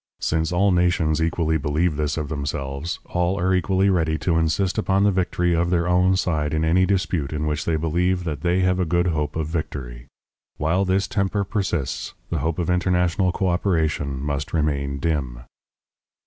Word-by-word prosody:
Since 80 0 0
all 95 +3 +3
nations 85 -3 +2
equally 80 -1 +1
believe 75 +3 0
this 75 +1 -1
of 75 -2 -2
themselves, 70 +1 -4
all 90 +2 -1
are 95 +1 +2
equally 95 +1 +2
ready 80 -3 +1
to 85 +2 0
insist 85 +5 +1
upon 95 -2 +2
the 105 - +4
victory 90 -1 0
of 85 +1 +1
their 85 -1 +1
own 90 +1 +3
side 80 -5 0
in 80 +1 +1
any 90 +3 +3
dispute 90 -7 0
in 75 0 -2
which 75 -1 -2
they 85 - +1
believe 90 +4 0
that 80 -4 -4
they 90 +1 +1
have 90 0 +2
a 90 - +1
good 85 +2 +1
hope 75 -3 -2
of 80 -1 -1
victory. 65 -6 -5 0.5
While 85 +6 +1
this 95 +1 +1
temper 100 0 0
persists, 95 - -2 0.2
the - - 0
hope 80 -1 -1
of 85 - -1
international 90 +1 +1
coöperation 85 -6 0
must 70 0 -3
remain 70 -3 0
dim. 70 -5 -2
85 Hz, 175 wpm, -23 LUFS, 75-90 Hz, 0.5 s, the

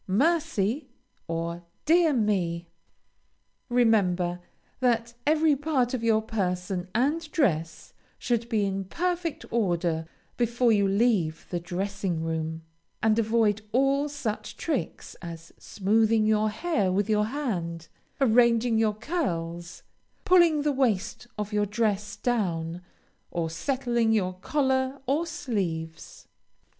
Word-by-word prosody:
"Mercy!" 265 - +1 0.4
or 170 +1 -3 0.2
"Dear 330 +1 +5
me!" 185 -8 0 1.0
Remember 190 -8 +2 0.4
that 235 -2 +1
every 310 -1 +4
part 275 -4 0
of 245 -3 -2
your 220 -1 +3
person 180 -4 -2
and 300 +7 +1
dress 165 - 0 0.2
should 235 -1 -1
be 215 -4 +1
in 195 0 -2
perfect 345 - -2
order 175 -7 0 0.3
before 240 0 +2
you 200 -2 +3
leave 195 -6 +1
the 175 - -1
dressing 180 -1 -3
room, 160 0 -3 0.4
and 220 0 +3
avoid 220 -1 +2
all 275 +3 +2
such 220 -7 -4
tricks 285 - -3
as 165 -1 -9
smoothing 215 +2 +2
your 215 0 +3
hair 215 - 0
with 195 +2 +1
your 210 -1 +2
hand, 180 - -3 0.3
arranging 235 -2 +4
your 215 -2 +2
curls, 175 - -3 0.4
pulling 340 -5 +5
the 295 - +2
waist 240 -5 0
of 210 0 -4
your 210 0 +1
dress 210 -1 -1
down, 175 -8 -1 0.5
or 165 -2 -2
settling 240 - 0
your 185 -4 +1
collar 265 +5 0
or 295 +6 0
sleeves. 180 - -4
215 Hz, 115 wpm, -27 LUFS, 180-255 Hz, 1.0 s, Dear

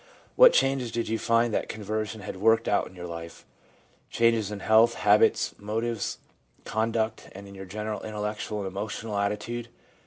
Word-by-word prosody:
What - - +9
changes 135 -3 +1
did 115 -1 -2
you 115 0 -1
find 115 0 +2
that - - -1
conversion 110 0 -4
had 95 - -7
worked 110 +3 +3
out 100 - +1
in 95 - -15
your 90 -1 -7
life: 85 -1 -8 0.4
— - - -36
changes 115 -3 +2
in 105 -1 -6
health, 115 +3 +5
habits, 105 +1 +3
motives, 110 +1 -2 0.5
conduct, 110 0 -1
and 100 +1 -10
in 100 - -12
your 95 0 -8
general 105 +2 -5
intellectual 105 0 -4
and 95 - -4
emotional 105 +3 -5
attitude? 105 +4 -2
110 Hz, 165 wpm, -27 LUFS, 100-115 Hz, 0.5 s, What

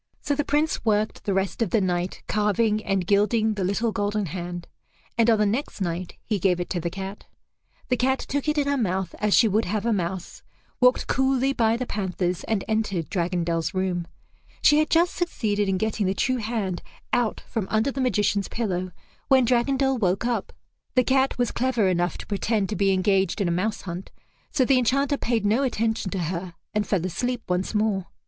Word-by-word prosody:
So 290 - -1
the 295 +1 0
Prince 300 +3 0
worked 215 -1 0
the 200 - +1
rest 195 +4 -1
of 225 - +2
the 220 - +3
night 180 -1 -1
carving 210 +1 +1
and 195 -2 0
gilding 215 +3 +2
the 200 -2 -3
little 210 +5 0
golden 205 -1 -1
hand, 175 +1 -5 0.5
and 230 0 +3
on 225 - +5
the 210 - +3
next 225 +6 -2
night 175 -1 -3
he 210 -3 -1
gave 180 -1 +2
it 175 - -4
to 180 - 0
the 170 +1 -2
cat. 195 +2 -7 0.6
The 250 - +2
cat 265 +2 +2
took 285 +2 -3
it 300 - 0
in 285 -1 +2
her 285 0 +1
mouth 190 -4 -1
as 210 -1 +3
she 230 - +6
would 215 +2 +1
have 210 +4 -2
a 235 - +2
mouse, 180 -1 -3 0.4
walked 250 0 +4
coolly 265 0 +2
by 230 -2 +2
the 255 - -3
panthers, 185 -4 -2
and 220 -4 0
entered 215 -7 -1
Dragondel's 170 -1 -1
room. 180 -2 -1 0.6
She 295 0 +6
had 310 - +1
just 340 +2 +3
succeeded 210 - -1
in 190 - +1
getting 215 0 0
the 190 - 0
true 255 +6 +1
hand 215 -6 -2 0.3
out 240 -3 +1
from 220 -5 -4
under 220 +5 +1
the 270 - -3
magician's 205 -4 +1
pillow 185 -5 -2 0.4
when 260 -2 +5
Dragondel 265 +2 +2
woke 190 +1 +1
up. 240 -1 -1 0.4
The 255 - +5
cat 265 +1 +2
was 245 -1 +1
clever 240 -5 +1
enough 175 -1 0
to - - -8
pretend 205 0 0
to 215 - -2
be 195 +1 +2
engaged 190 0 +2
in 195 - +1
a - - +1
mouse 200 +5 -1
hunt, 180 0 -6 0.4
so 265 -4 +2
the 260 0 +4
Enchanter 275 +4 +1
paid 230 -5 0
no 220 +6 +3
attention 225 -6 0
to 190 - -3
her 175 0 -5 0.2
and 210 -1 0
fell 185 -4 0
asleep 245 +7 -2
once 180 +4 -1
more. 210 -3 +1
210 Hz, 200 wpm, -25 LUFS, 185-245 Hz, 0.6 s, she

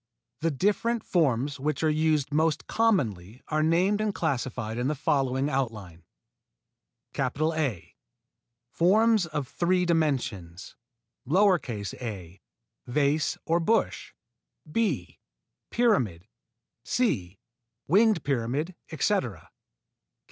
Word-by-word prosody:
The 165 +2 +1
different 210 - 0
forms 140 -4 +1
which 150 +2 -2
are - - +4
used 155 -2 +1
most 160 0 +1
commonly 125 - 0
are 155 0 +1
named 180 +6 +2
and 215 -2 -1
classified 125 -6 -2
in 125 - 0
the 150 - 0
following 135 -1 0
outline: 110 - -3 1.2
A. 155 - -1 0.8
Forms 215 +2 +3
of 150 -4 -3
three 180 +4 +1
dimensions: 125 - -1 0.6
a. 115 - 0 0.5
Vase 145 +4 +1
or 165 +1 +2
bush 220 +7 0 0.6
b. 165 - -1 0.5
Pyramid 120 - +1 0.6
c. 100 - -1 0.5
Winged 205 0 +4
pyramid, 140 +6 -1 0.2
etc. - - -1
_B. - - -57
150 Hz, 95 wpm, -27 LUFS, 120-175 Hz, 1.2 s, are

